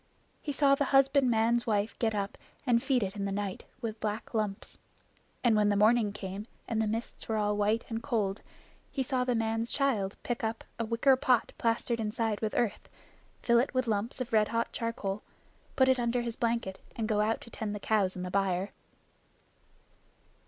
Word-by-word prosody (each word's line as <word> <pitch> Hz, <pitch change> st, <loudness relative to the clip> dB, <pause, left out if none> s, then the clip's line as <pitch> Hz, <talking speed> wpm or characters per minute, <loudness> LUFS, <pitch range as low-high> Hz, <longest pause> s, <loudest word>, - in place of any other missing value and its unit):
He 295 Hz, -, -3 dB
saw 280 Hz, 0 st, +4 dB
the 280 Hz, +1 st, +2 dB
husbandman's 250 Hz, -4 st, +3 dB
wife 210 Hz, 0 st, +1 dB
get 220 Hz, -2 st, +1 dB
up 200 Hz, -1 st, -2 dB, 0.3 s
and 240 Hz, -3 st, +4 dB
feed 255 Hz, -4 st, +2 dB
it 195 Hz, +1 st, -3 dB
in 200 Hz, -1 st, -2 dB
the 200 Hz, -, -1 dB
night 200 Hz, -1 st, -3 dB, 0.2 s
with 220 Hz, -2 st, -4 dB
black 215 Hz, +2 st, -3 dB
lumps. 210 Hz, -3 st, -2 dB, 0.6 s
And 235 Hz, -3 st, +5 dB
when 210 Hz, -1 st, +4 dB
the 205 Hz, -, +2 dB
morning 215 Hz, +1 st, +4 dB
came 200 Hz, +1 st, -6 dB, 0.2 s
and 220 Hz, -1 st, 0 dB
the 220 Hz, -, +1 dB
mists 225 Hz, +2 st, -4 dB
were 220 Hz, -, +1 dB
all 210 Hz, -1 st, +1 dB
white 210 Hz, +2 st, +1 dB
and 225 Hz, -1 st, -3 dB
cold, 215 Hz, -5 st, -1 dB, 0.5 s
he 270 Hz, -, -1 dB
saw 255 Hz, 0 st, 0 dB
the 250 Hz, -1 st, +1 dB
man's 225 Hz, +1 st, 0 dB
child 220 Hz, -9 st, 0 dB
pick 240 Hz, -2 st, -2 dB
up 225 Hz, 0 st, -2 dB, 0.2 s
a 230 Hz, -, 0 dB
wicker 235 Hz, +4 st, +4 dB
pot 250 Hz, -2 st, +2 dB
plastered 230 Hz, 0 st, 0 dB
inside 220 Hz, 0 st, -1 dB
with 215 Hz, -1 st, -1 dB
earth, 220 Hz, -4 st, -1 dB, 0.5 s
fill 235 Hz, -1 st, +5 dB
it 255 Hz, +2 st, 0 dB
with 255 Hz, -1 st, +2 dB
lumps 220 Hz, +2 st, -1 dB
of 250 Hz, -2 st, -4 dB
red 215 Hz, -1 st, +5 dB
hot 230 Hz, 0 st, -1 dB
charcoal, 210 Hz, -3 st, -3 dB, 0.5 s
put 260 Hz, -1 st, +5 dB
it 260 Hz, -1 st, +4 dB
under 240 Hz, 0 st, +1 dB
his 235 Hz, -1 st, -3 dB
blanket, 230 Hz, -5 st, -1 dB, 0.2 s
and 225 Hz, -2 st, -1 dB
go 210 Hz, -2 st, +2 dB
out 220 Hz, +2 st, +1 dB
to 235 Hz, -, -12 dB
tend 210 Hz, -2 st, -4 dB
the -, -, -4 dB
cows 200 Hz, -3 st, +1 dB
in 180 Hz, -, -4 dB
the 180 Hz, -, -4 dB
byre. 195 Hz, 0 st, 0 dB
225 Hz, 195 wpm, -30 LUFS, 210-240 Hz, 0.6 s, And